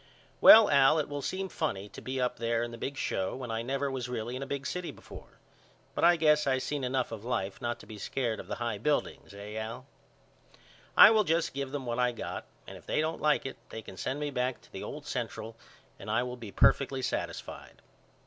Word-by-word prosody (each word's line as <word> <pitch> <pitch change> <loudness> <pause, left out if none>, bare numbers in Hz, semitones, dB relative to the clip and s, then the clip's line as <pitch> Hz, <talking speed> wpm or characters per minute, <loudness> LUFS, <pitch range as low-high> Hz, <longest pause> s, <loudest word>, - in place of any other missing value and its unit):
Well 220 -1 +10
Al 140 +2 +5
it 155 - 0
will 145 0 -4
seem 190 +7 -3
funny 125 - -3
to - - -10
be 130 +1 -4
up 125 -1 0
there 115 0 0
in 120 - -4
the 115 - -8
big 140 +3 -4
show 95 -6 -1
when 125 -3 -6
I 115 0 -1
never 135 +3 -2
was 125 -2 -4
really 120 0 -3
in 130 - -5
a 135 - -4
big 140 0 -4
city 180 -1 -3
before. - - -12 0.6
But - - -2
I 175 +1 +7
guess 150 -2 +3
I 130 -1 +3
seen 140 +1 -3
enough 130 -1 -1
of 110 -2 -7
life 110 -5 -3
not 120 0 -2
to - - -13
be 105 -1 -10
scared 115 0 -2
of - - -8
the - - -3
high 115 -3 -3
buildings 145 -1 -1
eh 105 +2 -7
Al? 110 +4 -5 1.1
I - - +11
will 215 -1 +4
just 165 -2 0
give 135 -1 -4
them 140 -2 -4
what 120 0 -2
I 125 0 +2
got - - -6 0.2
and - - -10
if - - -22
they - - 0
don't 160 +1 -1
like 150 -2 +2
it 135 - -5
they 110 - -7
can 95 - -10
send 130 +9 -3
me 145 -1 -2
back 125 -1 -1
to - - -22
the - - -7
old - - -7
Central 115 0 -4 0.4
and 100 - -8
I 110 +3 +2
will 125 0 -5
be 115 -5 -9
perfectly 135 +3 +3
satisfied. 125 - -5
130 Hz, 235 wpm, -30 LUFS, 115-145 Hz, 1.1 s, I